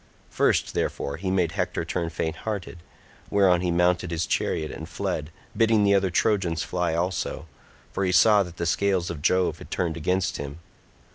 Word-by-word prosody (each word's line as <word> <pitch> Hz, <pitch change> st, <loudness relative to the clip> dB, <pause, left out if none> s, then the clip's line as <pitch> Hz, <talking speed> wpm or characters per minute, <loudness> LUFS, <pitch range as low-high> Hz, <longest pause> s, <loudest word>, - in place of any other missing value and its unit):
First, -, -, +1 dB
therefore, 70 Hz, -, -2 dB
he 95 Hz, +3 st, -3 dB
made 90 Hz, -4 st, +1 dB
Hector 80 Hz, -, -2 dB
turn 85 Hz, 0 st, -2 dB
fainthearted, 85 Hz, +4 st, -4 dB, 0.5 s
whereon 95 Hz, -3 st, +4 dB
he 90 Hz, -, 0 dB
mounted 90 Hz, 0 st, +2 dB
his 85 Hz, 0 st, -1 dB
chariot 75 Hz, -1 st, -1 dB
and -, -, -8 dB
fled, 75 Hz, -1 st, -3 dB, 0.3 s
bidding 110 Hz, -2 st, +3 dB
the 100 Hz, 0 st, +4 dB
other 95 Hz, -1 st, +3 dB
Trojans 90 Hz, -4 st, +1 dB
fly 90 Hz, -2 st, -1 dB
also, 85 Hz, -2 st, -2 dB, 0.5 s
for 100 Hz, -, -2 dB
he 90 Hz, -, +1 dB
saw 105 Hz, +3 st, +6 dB
that 90 Hz, -3 st, -6 dB
the 85 Hz, -, -2 dB
scales 95 Hz, 0 st, +1 dB
of 80 Hz, -4 st, -7 dB
Jove 90 Hz, +4 st, +2 dB
had -, -, -11 dB
turned 85 Hz, -3 st, -2 dB
against 90 Hz, +2 st, 0 dB
him. 70 Hz, +1 st, -6 dB
90 Hz, 170 wpm, -25 LUFS, 85-95 Hz, 0.5 s, saw